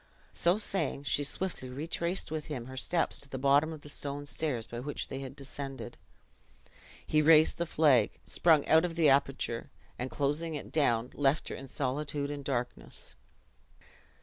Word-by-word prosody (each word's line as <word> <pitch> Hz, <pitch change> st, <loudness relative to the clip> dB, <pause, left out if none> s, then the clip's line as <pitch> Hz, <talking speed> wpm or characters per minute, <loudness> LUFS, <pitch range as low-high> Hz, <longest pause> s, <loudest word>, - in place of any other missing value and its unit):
So 175 Hz, +3 st, +3 dB
saying, 175 Hz, -9 st, -1 dB
she 145 Hz, +1 st, +1 dB
swiftly 145 Hz, -3 st, -2 dB
retraced 165 Hz, +6 st, -2 dB
with 155 Hz, -1 st, -3 dB
him 130 Hz, -7 st, -5 dB
her 130 Hz, +1 st, -9 dB
steps 165 Hz, +6 st, 0 dB
to 140 Hz, -, -12 dB
the 135 Hz, -, -4 dB
bottom 140 Hz, +4 st, +3 dB
of 155 Hz, -2 st, -8 dB
the -, -, -12 dB
stone 145 Hz, 0 st, -4 dB
stairs 145 Hz, -6 st, -2 dB
by 120 Hz, 0 st, -7 dB
which 145 Hz, +4 st, -4 dB
they 135 Hz, -, -4 dB
had 135 Hz, 0 st, -7 dB
descended. 135 Hz, -3 st, -7 dB, 1.1 s
He 155 Hz, -, +3 dB
raised 155 Hz, +1 st, +6 dB
the 170 Hz, -, 0 dB
flag, 140 Hz, -10 st, +4 dB
sprung 160 Hz, -4 st, +4 dB
out 160 Hz, +1 st, +5 dB
of 175 Hz, -2 st, -2 dB
the 165 Hz, -3 st, +4 dB
aperture, 135 Hz, -2 st, +1 dB, 0.3 s
and 125 Hz, +1 st, -2 dB
closing 150 Hz, +4 st, -1 dB
it 145 Hz, -, -7 dB
down, 125 Hz, -6 st, +2 dB
left 145 Hz, +2 st, +1 dB
her -, -, -4 dB
in 135 Hz, -, -8 dB
solitude 140 Hz, +2 st, -2 dB
and 145 Hz, -1 st, -5 dB
darkness. 125 Hz, -3 st, -3 dB
145 Hz, 170 wpm, -31 LUFS, 135-155 Hz, 1.1 s, raised